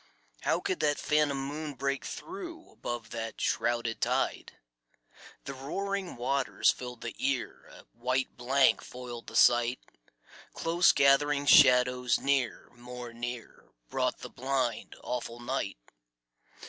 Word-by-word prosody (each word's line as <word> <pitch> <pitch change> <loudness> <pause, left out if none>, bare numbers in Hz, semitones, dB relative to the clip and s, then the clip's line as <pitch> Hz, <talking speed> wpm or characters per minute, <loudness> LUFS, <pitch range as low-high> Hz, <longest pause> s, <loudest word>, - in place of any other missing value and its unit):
How - - +1
could 385 -3 -2
that 145 -1 +2
phantom 145 -3 +1
moon 150 +1 -5
break 140 +1 -2
through, 345 -2 -8
Above 120 -2 -6
that 115 -1 -5
shrouded 120 -1 0
tide? - - -1 0.9
The 140 - -6
roaring 190 +8 -3
waters 130 +2 +2
filled 125 -2 -8
the 120 - -5
ear, 135 -2 -2
A - - -14
white 130 +3 -1
blank 130 +3 +3
foiled 125 -2 -8
the - - -9
sight. 120 +1 +4 0.8
Close 170 +2 +4
gathering 140 +1 +3
shadows 125 -2 +6
near, 135 -4 -1
more 120 0 -9
near, 120 0 -7 0.2
Brought - - -1
the - - -7
blind, 130 -3 -2
awful 120 -1 -4
night. 120 - -3
130 Hz, 120 wpm, -30 LUFS, 120-140 Hz, 0.9 s, shadows